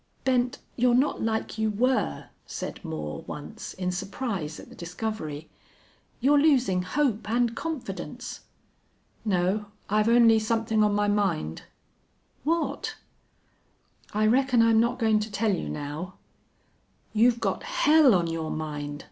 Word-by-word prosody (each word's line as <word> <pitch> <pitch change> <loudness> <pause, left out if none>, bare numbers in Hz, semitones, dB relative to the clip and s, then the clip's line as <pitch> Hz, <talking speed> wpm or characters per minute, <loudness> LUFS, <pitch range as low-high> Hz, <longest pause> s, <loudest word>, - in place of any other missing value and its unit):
"Bent, 250 -1 +1 0.2
you're 245 0 +3
not 270 +4 +2
like 220 0 -2
you 220 0 +2
were," 215 - 0 0.2
said - - -6
Moore, 75 -2 -5
once, - - -7
in 180 -1 -2
surprise 195 - -4
at - - -11
the - - -14
discovery. 170 -4 -5 0.7
"You're 285 +4 +4
losing 255 -12 +3
hope 225 +1 0
and 235 0 +1
confidence." 320 -3 -5 0.8
"No. 200 0 0 0.2
I've 215 +1 +3
only 230 -2 +6
somethin' 220 0 +1
on 210 -1 +2
my 205 0 +2
mind." 195 - 0 0.8
"What?" 330 +4 -1 1.2
"I 215 +1 +1
reckon 250 +1 +4
I'm 225 -1 +5
not 235 +2 +2
goin' 220 -3 +3
to 215 0 -4
tell 205 +1 +1
you 180 - -3
now." 150 +5 -5 1.0
"You've 235 +2 +4
got - - -1
hell 315 - +5
on 175 -2 +2
your 165 -1 -3
mind!" 145 -2 -4
215 Hz, 130 wpm, -27 LUFS, 180-245 Hz, 1.2 s, only